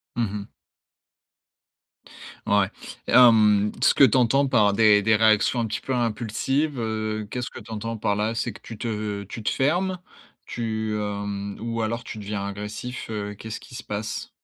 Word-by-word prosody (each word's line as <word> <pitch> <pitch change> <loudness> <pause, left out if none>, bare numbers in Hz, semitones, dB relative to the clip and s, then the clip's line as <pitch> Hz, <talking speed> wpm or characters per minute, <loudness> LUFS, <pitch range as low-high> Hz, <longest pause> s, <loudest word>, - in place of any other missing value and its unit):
Mmh 115 -4 0
mh. 105 -1 -5 2.0
Ouais 100 -2 +3 0.4
et - - -2
hem, 105 -4 +6
ce - - +4
que - - +6
tu 130 - +6
entends 135 +3 +3
par 105 -6 +3
des 105 -1 +5
des 110 +1 +3
réactions 110 +2 +3
un 115 - 0
petit 110 - -3
peu 130 - -2
impulsives, 125 +5 -1
heu, 110 -1 -2
qu'est-ce 125 -1 -3
que - - -10
tu 115 - -12
entends 115 +1 -4
par 100 -1 0
là? 110 +2 -1
C'est 115 +1 -1
que - - -14
tu 115 - -9
te 105 -2 -3
tu 105 +3 -8
te 105 - 0
fermes, 180 +7 +1 0.5
tu 110 -2 -3
hem 100 -1 -4
ou 115 0 -3
alors 115 +2 -2
tu 110 - -7
deviens 100 -1 -4
agressif, 105 +5 -6
heu, 105 -1 -4
qu'est-ce 110 +2 -7
qui 130 - -15
se 125 - -6
passe? 105 +2 -4
110 Hz, 180 wpm, -24 LUFS, 105-120 Hz, 2.0 s, hem